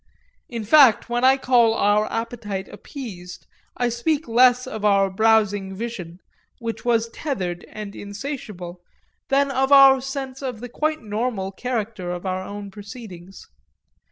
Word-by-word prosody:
In 235 -3 -4
fact 250 0 +5
when 240 +1 0
I 265 +1 +6
call 240 -4 +3
our 210 0 +2
appetite 225 -4 -4
appeased 205 -7 -9 0.3
I 245 -1 +1
speak 280 +6 -1
less 250 +2 +4
of 220 -5 -6
our 195 -2 +3
browsing 205 -2 +2
vision, 190 -6 -6 0.4
which 230 -2 -5
was 230 -1 +2
tethered 190 - -4
and 210 -2 -8
insatiable, 200 -5 -7 0.5
than 275 0 +2
of 265 +1 0
our 270 -1 +8
sense 270 0 -5
of 255 -5 -4
the 245 +2 -7
quite 310 +3 -2
normal 210 -2 -2
character 220 -4 -4
of 180 +1 -5
our 185 0 -2
own 200 0 -8
proceedings. 200 -3 -11
225 Hz, 140 wpm, -22 LUFS, 200-255 Hz, 0.5 s, our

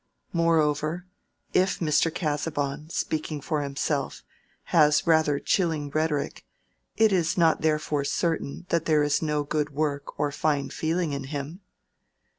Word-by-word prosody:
Moreover, 165 0 +1 0.5
if 185 +1 +2
Mr. 165 0 +2
Casaubon, 150 -2 -2
speaking 155 -2 -2
for 150 +2 -2
himself, 140 0 -2 0.5
has 150 -2 +5
rather 160 -3 +3
a - - -2
chilling 160 -6 0
rhetoric, 155 -1 -1 0.5
it 220 -1 +5
is 175 -3 +1
not 165 -2 +3
therefore 150 -2 0
certain 160 +2 -2
that 170 -1 +1
there 155 -2 +3
is 145 0 +1
no 150 -2 0
good 150 0 -1
work 145 -1 -3
or 145 -1 +1
fine 145 -2 0
feeling 160 -1 -1
in 140 -1 -4
him. 145 +6 -6
155 Hz, 135 wpm, -26 LUFS, 145-165 Hz, 0.5 s, has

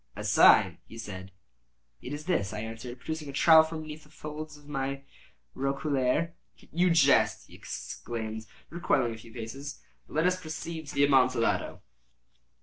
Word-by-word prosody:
"A - - -6
sign," - - +6
he 115 - -11
said. 95 -4 -7 0.7
"It 125 - -7
is 145 +1 -6
this," 110 - 0
I 105 - -4
answered, 115 +3 -7
producing 155 +3 -5
a - - -4
trowel 160 +3 +7
from 160 0 -4
beneath 155 0 -8
the - - -20
folds 155 0 -8
of 145 0 -18
my 135 -1 -3 0.5
roquelaire. 140 +3 0 0.2
"You 180 +2 0
jest," 160 -5 +4
he - - -19
exclaimed, 110 -2 -6 0.2
recoiling 135 -8 +1
a - - -8
few 115 0 -14
paces. 130 +5 -7 0.3
"But - - -12
let 160 +2 +2
us 180 0 +1
proceed 160 0 -6
to - - -8
the 140 - +4
Amontillado." 130 -4 +2
140 Hz, 160 wpm, -29 LUFS, 120-155 Hz, 0.7 s, trowel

